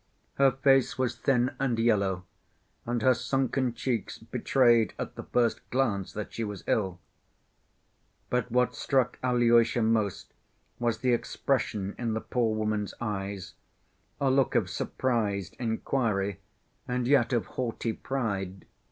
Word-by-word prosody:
Her 135 Hz, 0 st, +7 dB
face 135 Hz, 0 st, +3 dB
was 130 Hz, -2 st, 0 dB
thin 125 Hz, -2 st, +2 dB
and 130 Hz, -4 st, +1 dB
yellow, 100 Hz, -5 st, +1 dB, 0.6 s
and 120 Hz, -1 st, -1 dB
her 130 Hz, -, +6 dB
sunken 130 Hz, +1 st, 0 dB
cheeks 120 Hz, -4 st, -2 dB
betrayed 120 Hz, -4 st, +2 dB
at -, -, -5 dB
the -, -, -7 dB
first 120 Hz, -2 st, 0 dB
glance 115 Hz, -7 st, 0 dB
that 105 Hz, -, -5 dB
she 115 Hz, -, -3 dB
was 105 Hz, -3 st, -5 dB
ill. 95 Hz, -4 st, 0 dB, 1.3 s
But 125 Hz, -1 st, 0 dB
what 125 Hz, +1 st, +2 dB
struck 130 Hz, -3 st, 0 dB
Alyosha 120 Hz, -2 st, +3 dB
most 110 Hz, -3 st, 0 dB, 0.5 s
was 120 Hz, -2 st, 0 dB
the 125 Hz, -1 st, +3 dB
expression 110 Hz, -5 st, -1 dB
in 115 Hz, -2 st, -1 dB
the -, -, 0 dB
poor 115 Hz, -3 st, 0 dB
woman's 110 Hz, -1 st, -1 dB
eyes—a 100 Hz, +5 st, -5 dB
look 135 Hz, -1 st, +2 dB
of -, -, +2 dB
surprised 105 Hz, -8 st, -1 dB
inquiry 110 Hz, -4 st, -1 dB, 0.5 s
and 125 Hz, -1 st, -1 dB
yet 135 Hz, -3 st, +4 dB
of 120 Hz, -3 st, +1 dB
haughty 115 Hz, -2 st, -3 dB
pride. 100 Hz, -9 st, -3 dB
120 Hz, 130 wpm, -28 LUFS, 105-125 Hz, 1.3 s, Her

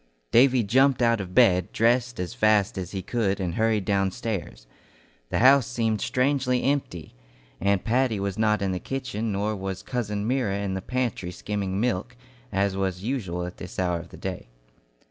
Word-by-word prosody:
Davy 125 Hz, 0 st, +5 dB
jumped 130 Hz, +4 st, +3 dB
out 115 Hz, -2 st, +3 dB
of 90 Hz, -1 st, -8 dB
bed, 90 Hz, -8 st, +4 dB
dressed 120 Hz, +2 st, +1 dB
as 90 Hz, +3 st, -3 dB
fast 110 Hz, -4 st, +2 dB
as 90 Hz, -3 st, -4 dB
he 95 Hz, -1 st, -5 dB
could, 100 Hz, -2 st, -1 dB
and 90 Hz, -3 st, -2 dB
hurried 110 Hz, -1 st, +1 dB
downstairs. 95 Hz, -, -2 dB, 0.6 s
The -, -, -1 dB
house 130 Hz, 0 st, +6 dB
seemed 115 Hz, -4 st, -1 dB
strangely 130 Hz, -1 st, +1 dB
empty; 135 Hz, -, -2 dB, 0.5 s
Aunt 100 Hz, 0 st, +1 dB
Patty 120 Hz, -2 st, +1 dB
was 100 Hz, -1 st, -2 dB
not 105 Hz, -1 st, +1 dB
in 95 Hz, -, 0 dB
the 90 Hz, -, -2 dB
kitchen, 115 Hz, -4 st, -3 dB
nor 105 Hz, +2 st, -1 dB
was 95 Hz, -1 st, -5 dB
cousin 105 Hz, -4 st, -3 dB
Myra 120 Hz, -6 st, 0 dB
in 100 Hz, -1 st, -2 dB
the 95 Hz, -, -3 dB
pantry 120 Hz, -5 st, -2 dB
skimming 95 Hz, +1 st, -3 dB
milk, 120 Hz, +1 st, -1 dB, 0.3 s
as 100 Hz, -1 st, 0 dB
was 95 Hz, -1 st, -2 dB
usual 95 Hz, -9 st, -2 dB
at 90 Hz, -, -8 dB
this 90 Hz, -, -9 dB
hour 90 Hz, -2 st, 0 dB
of 85 Hz, +1 st, -11 dB
the -, -, -12 dB
day. 95 Hz, -8 st, -5 dB
105 Hz, 175 wpm, -25 LUFS, 95-125 Hz, 0.6 s, house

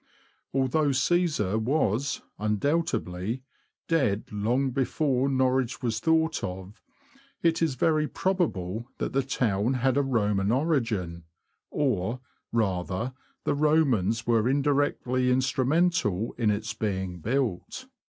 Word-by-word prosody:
Although 135 Hz, +2 st, +1 dB
Caesar 135 Hz, -, +1 dB
was, 125 Hz, 0 st, 0 dB, 0.2 s
undoubtedly, 110 Hz, -, -1 dB, 0.4 s
dead 130 Hz, -11 st, +1 dB
long 120 Hz, +6 st, 0 dB
before 135 Hz, 0 st, +1 dB
Norwich 130 Hz, -2 st, +1 dB
was 110 Hz, -2 st, 0 dB
thought 160 Hz, +1 st, +1 dB
of, 95 Hz, +3 st, -6 dB, 0.6 s
it 165 Hz, -1 st, +2 dB
is 160 Hz, -5 st, +1 dB
very 155 Hz, +3 st, +2 dB
probable 120 Hz, -, -1 dB
that -, -, -3 dB
the 135 Hz, -, +3 dB
town 120 Hz, -2 st, 0 dB
had 130 Hz, +1 st, +1 dB
a -, -, +4 dB
Roman 105 Hz, -6 st, +1 dB
origin, 115 Hz, -, 0 dB, 0.4 s
or, 125 Hz, -4 st, 0 dB, 0.3 s
rather, 95 Hz, +2 st, -1 dB, 0.3 s
the -, -, +1 dB
Romans 135 Hz, -, +2 dB
were 115 Hz, 0 st, +2 dB
indirectly 135 Hz, -2 st, +1 dB
instrumental 130 Hz, -, +1 dB
in 115 Hz, -3 st, +1 dB
its 110 Hz, +2 st, -1 dB
being 95 Hz, -5 st, -3 dB
built. 120 Hz, -, -2 dB
125 Hz, 110 wpm, -27 LUFS, 105-140 Hz, 0.6 s, a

